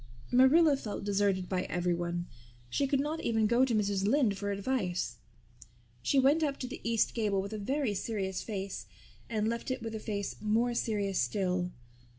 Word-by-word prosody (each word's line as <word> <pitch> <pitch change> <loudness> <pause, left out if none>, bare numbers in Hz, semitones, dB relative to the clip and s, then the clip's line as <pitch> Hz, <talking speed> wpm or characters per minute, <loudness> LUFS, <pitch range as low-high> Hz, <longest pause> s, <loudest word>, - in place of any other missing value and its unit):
Marilla 280 +5 +6
felt 215 -8 -5
deserted 200 -2 +1
by 185 -1 0
everyone. 175 -1 -1 0.5
She 275 - +1
could 275 0 +1
not 300 +3 -1
even 225 -1 +1
go 235 +4 +4
to 240 -3 0
Mrs. 200 -2 +1
Lynde 225 -1 +3
for 205 +1 -3
advice. 195 - -1 0.8
She 275 - +1
went 275 +4 +5
up 285 -3 0
to 255 - -3
the 250 - -7
east 230 -1 +1
gable 210 -4 +1
with 200 +2 -4
a 215 - -3
very 260 +2 0
serious 190 -2 -2
face 200 -3 -5 0.4
and 215 -2 0
left 235 +3 -2
it 255 -2 -2
with 225 -1 -4
a 220 - -3
face 205 -2 -3
more 225 +3 +2
serious 205 -5 0
still. 180 -3 0
215 Hz, 175 wpm, -31 LUFS, 195-250 Hz, 0.8 s, Marilla